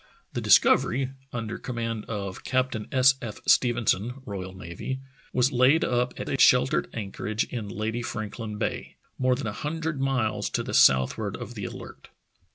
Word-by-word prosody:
The - - -2
Discovery, 130 +1 +4 0.2
under 115 -2 -4
command 115 -3 -4
of 100 -4 -5
Captain 130 -4 -1
S. 130 0 +6
F. 110 -5 -6
Stephenson, 120 -2 +2
R.N., 95 +4 -6 0.3
was 125 +2 +2
laid 130 +5 +4
up 125 0 0
at - - -4
a 135 - -2
shel 125 0 +6
tered 135 - -1
anchorage 105 +1 -3
in 110 -5 -5
Lady 110 +3 -3
Franklin 110 -1 -5
Bay, 110 - -3 0.2
more 130 -1 +3
than 130 - -5
a 110 - -3
hundred 155 +3 -3
miles 110 -6 0
to - - -1
the - - -6
southward 65 0 +4
of - - -8
the - - -5
Alert. - - -9
120 Hz, 160 wpm, -26 LUFS, 105-130 Hz, 0.3 s, S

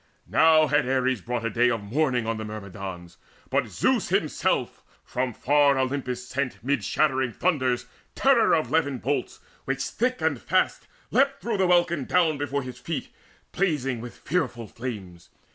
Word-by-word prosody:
Now 160 -1 +5
had 145 -2 +1
Ares 130 -3 +1
brought 120 +2 -3
A 115 - -1
day 120 +2 +3
of 115 -3 -2
mourning 125 +1 0
on 115 0 -1
the 110 - -5
Myrmidons, 100 -4 -8 0.3
But - - +1
Zeus - - +1
himself - - 0 0.2
from 125 0 -2
far 140 +2 +3
Olympus 130 -2 -2
sent 130 -3 -3
Mid 140 +3 0
shattering 130 -5 +1
thunders 130 -9 0 0.3
terror 265 -9 +4
of 155 - -1
levin 145 -4 +1
bolts 135 +1 -3 0.2
Which 135 0 -1
thick 250 +2 -1
and - - 0
fast - - 0 0.2
leapt 275 +1 +2
through 230 -3 -1
the 190 -1 +2
welkin 175 -5 +2
down 160 -5 +2
Before 140 -1 -2
his 125 0 -8
feet, - - -4 0.4
blazing 135 -10 0
with 120 0 -9
fearful 135 -8 -2
flames. 100 -7 -8
130 Hz, 160 wpm, -26 LUFS, 120-155 Hz, 0.4 s, Now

